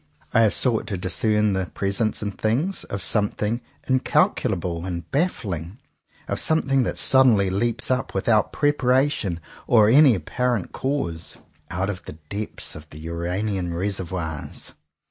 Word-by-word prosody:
I 115 Hz, -, +5 dB
have 110 Hz, -2 st, +4 dB
sought 120 Hz, -4 st, +1 dB
to 100 Hz, -, -3 dB
discern 105 Hz, +3 st, +1 dB
the 95 Hz, -1 st, -1 dB
presence 100 Hz, +4 st, -1 dB
in 105 Hz, -, -2 dB
things, 125 Hz, -, -1 dB
of 100 Hz, -1 st, -4 dB
something 105 Hz, +2 st, 0 dB, 0.3 s
incalcul 130 Hz, -1 st, +2 dB
able 85 Hz, -1 st, -4 dB
and 85 Hz, -2 st, -4 dB
baffling, 105 Hz, -, -2 dB, 0.5 s
of -, -, -2 dB
something 135 Hz, -4 st, +2 dB
that 125 Hz, -, -1 dB
sudden 130 Hz, -4 st, +6 dB
ly 100 Hz, -1 st, +1 dB
leaps 115 Hz, +6 st, 0 dB
up 130 Hz, +1 st, -1 dB
without 105 Hz, +2 st, +2 dB
preparation 135 Hz, -, +1 dB, 0.3 s
or 110 Hz, -3 st, +5 dB
any 135 Hz, 0 st, +7 dB
ap 85 Hz, -5 st, -6 dB
parent 125 Hz, -6 st, -1 dB
cause, 85 Hz, -, -3 dB, 0.3 s
out 95 Hz, +4 st, -1 dB
of 95 Hz, -2 st, -9 dB
the -, -, -7 dB, 0.2 s
depths 105 Hz, +1 st, -5 dB
of 75 Hz, 0 st, -11 dB
the 75 Hz, -, -12 dB
Uranian 90 Hz, +3 st, -3 dB
reservoirs. 90 Hz, -4 st, -4 dB
105 Hz, 145 wpm, -23 LUFS, 90-125 Hz, 0.5 s, any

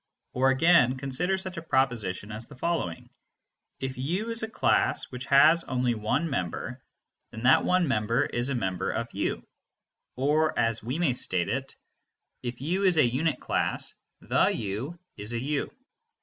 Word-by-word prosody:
Or 130 Hz, +1 st, +3 dB
again 135 Hz, -2 st, +4 dB
consider 140 Hz, +8 st, -1 dB
such 190 Hz, -1 st, -3 dB
a -, -, -3 dB
proposition 115 Hz, -, -1 dB
as 110 Hz, +2 st, -7 dB
the 145 Hz, -, -13 dB
following: 130 Hz, -, -3 dB, 0.7 s
"If 130 Hz, -1 st, -4 dB
u 185 Hz, -, -2 dB
is 230 Hz, -, +3 dB
a 220 Hz, -, -3 dB
class -, -, +1 dB
which 125 Hz, +1 st, -6 dB
has 155 Hz, +5 st, +6 dB
only 125 Hz, -2 st, 0 dB
one 110 Hz, +9 st, -1 dB
member, 90 Hz, -, -4 dB, 0.5 s
then 110 Hz, -, -9 dB
that 130 Hz, +2 st, +5 dB
one 180 Hz, -2 st, +2 dB
member 115 Hz, -2 st, +1 dB
is 120 Hz, +2 st, -2 dB
a 140 Hz, -, -1 dB
member 95 Hz, -6 st, -2 dB
of -, -, -3 dB
u," -, -, -2 dB, 0.7 s
or 150 Hz, +4 st, +1 dB
as 115 Hz, -1 st, +1 dB
we 125 Hz, +7 st, -3 dB
may 170 Hz, -7 st, +2 dB
state 90 Hz, -7 st, 0 dB
it, 135 Hz, +1 st, -3 dB, 0.7 s
"If 120 Hz, 0 st, -6 dB
u 180 Hz, +7 st, -1 dB
is 185 Hz, -4 st, +4 dB
a 150 Hz, -, +6 dB
unit 135 Hz, +7 st, 0 dB
class, -, -, 0 dB, 0.3 s
the -, -, +2 dB
u 115 Hz, -, -3 dB, 0.2 s
is 105 Hz, +3 st, -2 dB
a 115 Hz, -, -1 dB
u." 140 Hz, +3 st, -2 dB
130 Hz, 165 wpm, -27 LUFS, 115-160 Hz, 0.7 s, has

